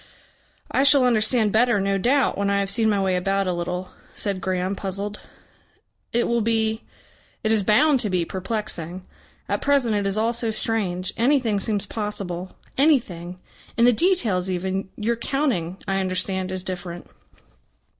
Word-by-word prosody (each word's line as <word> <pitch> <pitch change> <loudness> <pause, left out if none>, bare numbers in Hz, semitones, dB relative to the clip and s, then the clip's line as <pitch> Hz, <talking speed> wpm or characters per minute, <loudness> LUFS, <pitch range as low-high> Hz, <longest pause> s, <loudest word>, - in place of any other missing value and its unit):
"I - - +2
shall 280 -1 +6
understand 220 -2 +3
better, 235 0 +3
no 195 0 0
doubt, 260 +5 +2
when 200 0 0
I 200 0 +2
have 195 0 -2
seen 220 +2 +2
my 205 -2 +2
way 190 -1 +1
about 195 +2 0
a 180 - 0
little," 180 +1 -4 0.2
said 195 -3 -2
Graham 185 +1 -1
puzzled. 200 +2 -4 0.9
"It 240 +1 +1
will 235 0 +1
be 220 0 0 0.6
it 215 - +1
is 220 -2 +4
bound 275 +8 +4
to 215 - -1
be 180 -2 0
perplexing. 185 -2 -4 0.4
At - - -1
present 275 -5 +2
it 205 -1 0
is 195 +1 0
all 225 +2 +1
so 235 -1 0
strange. 200 -5 -1
Anything 240 -4 +2
seems 205 -1 -1
possible. 190 -4 -4 0.2
Anything. 190 - +1 0.4
In 235 - +5
the 245 - +6
details 220 - +1
even. 190 +1 -2
Your 230 +2 -1
counting, 235 - -1
I 195 0 0
understand, 185 0 -2
is 185 -1 -2
different." 175 -2 -6
200 Hz, 160 wpm, -23 LUFS, 185-230 Hz, 0.9 s, shall